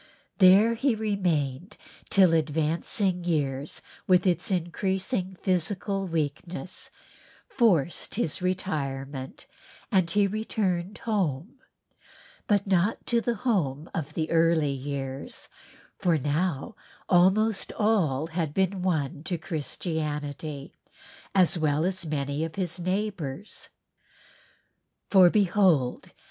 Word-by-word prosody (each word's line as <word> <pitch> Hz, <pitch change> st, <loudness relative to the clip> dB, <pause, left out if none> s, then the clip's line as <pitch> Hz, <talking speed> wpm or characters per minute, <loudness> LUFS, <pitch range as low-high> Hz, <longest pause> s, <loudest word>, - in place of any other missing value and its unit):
There 195 Hz, +4 st, +7 dB
he 245 Hz, +1 st, +1 dB
remained 185 Hz, -6 st, -1 dB, 0.3 s
till 185 Hz, -4 st, +5 dB
advancing 165 Hz, +4 st, 0 dB
years 145 Hz, -4 st, -2 dB, 0.2 s
with 185 Hz, 0 st, +4 dB
its 180 Hz, -2 st, +1 dB
increasing 190 Hz, +2 st, -1 dB
physical 195 Hz, +1 st, -1 dB
weakness 165 Hz, +1 st, -3 dB, 0.6 s
forced 180 Hz, -, +1 dB
his 180 Hz, -7 st, -1 dB
retirement 140 Hz, -7 st, -3 dB, 0.5 s
and 185 Hz, -5 st, +3 dB
he 205 Hz, +3 st, +3 dB
returned 200 Hz, -2 st, -2 dB
home, 200 Hz, -, -2 dB, 0.9 s
but 205 Hz, -2 st, +2 dB
not 190 Hz, +2 st, +1 dB
to 235 Hz, -1 st, +2 dB
the 235 Hz, 0 st, -1 dB
home 165 Hz, -, -1 dB
of 155 Hz, -1 st, -4 dB
the 160 Hz, -1 st, -2 dB
early 165 Hz, -3 st, +3 dB
years 135 Hz, 0 st, -5 dB, 0.5 s
for 170 Hz, -3 st, +2 dB
now 150 Hz, -, -1 dB, 0.3 s
almost 195 Hz, +3 st, +3 dB
all 180 Hz, -10 st, +1 dB
had 160 Hz, -2 st, -3 dB
been 190 Hz, 0 st, +1 dB
won 155 Hz, -4 st, -1 dB
to 175 Hz, -, -1 dB
Christianity, 150 Hz, -2 st, -4 dB, 0.6 s
as 180 Hz, -2 st, +4 dB
well 155 Hz, 0 st, +1 dB
as 185 Hz, -2 st, -2 dB
many 145 Hz, 0 st, -2 dB
of 160 Hz, -1 st, -5 dB
his 180 Hz, -3 st, -2 dB
neighbors. 185 Hz, -3 st, -3 dB, 1.4 s
"For 185 Hz, -3 st, +8 dB
behold 180 Hz, -9 st, +2 dB
175 Hz, 105 wpm, -27 LUFS, 150-195 Hz, 1.4 s, For